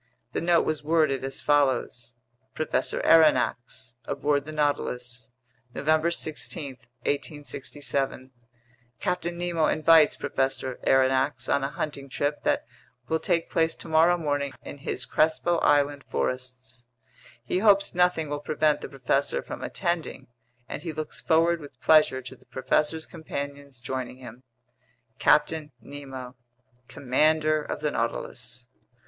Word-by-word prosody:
The -, -, -1 dB
note 170 Hz, 0 st, +3 dB
was 155 Hz, -1 st, -1 dB
worded 155 Hz, -4 st, +2 dB
as 135 Hz, 0 st, -4 dB
follows: 130 Hz, -4 st, +1 dB, 0.4 s
Professor 155 Hz, -, 0 dB
Aronnax 130 Hz, -6 st, +3 dB
Aboard 145 Hz, -1 st, 0 dB
the 155 Hz, -, -7 dB
Nautilus 125 Hz, -5 st, -1 dB, 0.5 s
November 155 Hz, +3 st, +2 dB
16, 150 Hz, -4 st, -3 dB, 0.3 s
1867 140 Hz, -2 st, -3 dB, 0.7 s
Captain 175 Hz, -1 st, -2 dB
Nemo 170 Hz, -3 st, 0 dB
invites 155 Hz, -1 st, +5 dB
Professor 130 Hz, -1 st, -2 dB
Aronnax 130 Hz, -1 st, +2 dB
on 140 Hz, -, +1 dB
a 135 Hz, -, -1 dB
hunting 145 Hz, -2 st, -5 dB
trip 145 Hz, +2 st, -2 dB
that -, -, +1 dB, 0.4 s
will 160 Hz, -, +1 dB
take 170 Hz, -1 st, 0 dB
place 160 Hz, 0 st, +2 dB
tomorrow 165 Hz, +2 st, +3 dB
morning 145 Hz, -4 st, -1 dB
in 145 Hz, -, -9 dB
his -, -, -3 dB
Crespo 160 Hz, +2 st, +2 dB
Island 145 Hz, -1 st, +2 dB
forests. 130 Hz, -1 st, -4 dB, 0.6 s
He 180 Hz, -, -1 dB
hopes 200 Hz, -1 st, +4 dB
nothing 180 Hz, -3 st, +2 dB
will 145 Hz, 0 st, -3 dB
prevent 150 Hz, 0 st, +1 dB
the -, -, -6 dB
professor 135 Hz, +1 st, 0 dB
from -, -, -7 dB
attending, 170 Hz, -3 st, -2 dB, 0.4 s
and -, -, -6 dB
he 165 Hz, 0 st, -4 dB
looks 155 Hz, 0 st, -6 dB
forward 165 Hz, +1 st, +3 dB
with 140 Hz, -4 st, -13 dB
pleasure 150 Hz, -4 st, +4 dB
to 130 Hz, -, -8 dB
the -, -, -25 dB
professor's 150 Hz, +4 st, 0 dB
companions 140 Hz, -4 st, -7 dB
joining 125 Hz, +1 st, -5 dB
him. 125 Hz, -1 st, -11 dB, 0.8 s
CAPTAIN 150 Hz, 0 st, +3 dB
NEMO, 130 Hz, 0 st, -9 dB, 0.5 s
Commander 155 Hz, +3 st, +2 dB
of -, -, -5 dB
the -, -, 0 dB
Nautilus. -, -, -4 dB
145 Hz, 125 wpm, -26 LUFS, 130-160 Hz, 0.8 s, invites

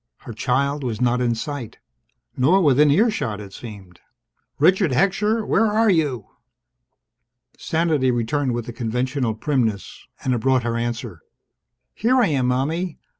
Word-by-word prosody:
Her 120 Hz, -, -9 dB
child 140 Hz, +5 st, -1 dB
was 115 Hz, -4 st, -3 dB
not 125 Hz, 0 st, +1 dB
in 120 Hz, -1 st, +1 dB
sight. 130 Hz, -1 st, -6 dB, 0.6 s
Nor 175 Hz, +10 st, +3 dB
within 145 Hz, 0 st, +4 dB
earshot, 150 Hz, -, +1 dB
it 100 Hz, -2 st, -10 dB
seemed. 95 Hz, -6 st, -11 dB, 0.6 s
"Richard 185 Hz, +4 st, +3 dB
Heckscher! 210 Hz, -, +1 dB
Where 225 Hz, -, +2 dB
are 215 Hz, 0 st, +3 dB
you?" 145 Hz, -, 0 dB, 1.3 s
Sanity 160 Hz, -5 st, 0 dB
returned 125 Hz, +2 st, -1 dB
with 120 Hz, -2 st, -4 dB
the 120 Hz, -, -7 dB
conventional 125 Hz, 0 st, -2 dB
primness. 115 Hz, -5 st, -2 dB, 0.2 s
And 130 Hz, -, 0 dB
it 120 Hz, -, 0 dB
brought 130 Hz, +1 st, +2 dB
her 115 Hz, 0 st, -2 dB
answer. 115 Hz, -1 st, -4 dB, 0.7 s
"Here 240 Hz, +4 st, +1 dB
I 225 Hz, -7 st, +3 dB
am, 135 Hz, -4 st, 0 dB
Mommie! 155 Hz, +7 st, -1 dB
130 Hz, 140 wpm, -22 LUFS, 120-160 Hz, 1.3 s, within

